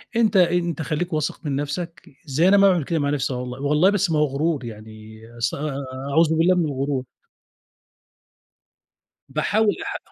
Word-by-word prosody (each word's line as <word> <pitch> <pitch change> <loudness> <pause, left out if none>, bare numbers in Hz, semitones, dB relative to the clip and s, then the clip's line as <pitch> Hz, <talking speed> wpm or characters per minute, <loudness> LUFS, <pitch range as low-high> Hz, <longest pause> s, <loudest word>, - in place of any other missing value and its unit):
أنت 220 -4 +3
أنت 175 -2 +2
خليك 160 +3 -2
واثق 155 -2 -2
من 145 -2 -1
نفسك 150 +3 -5 0.2
زي 155 +4 +2
أنا 200 +1 +6
ما 200 0 +6
باعمل 175 -4 +2
كده 160 +3 -1
مع 140 - 0
نفسي 140 -2 -1
والله 125 +1 -5
والله 150 +6 +3
بس 200 -4 +1
ما 155 - +2
هو 150 - +4
غرور 145 0 -1
يعني 110 0 -11 0.2
أست 120 +1 -1
آآ 140 -1 -4 0.3
أعوذ 160 +1 +3
بالله 180 +3 +4
من 175 -2 +1
الغرور. 135 -2 -2 2.3
باحاول 215 0 +1
أح - - -3
150 Hz, 165 wpm, -22 LUFS, 135-175 Hz, 2.3 s, أنا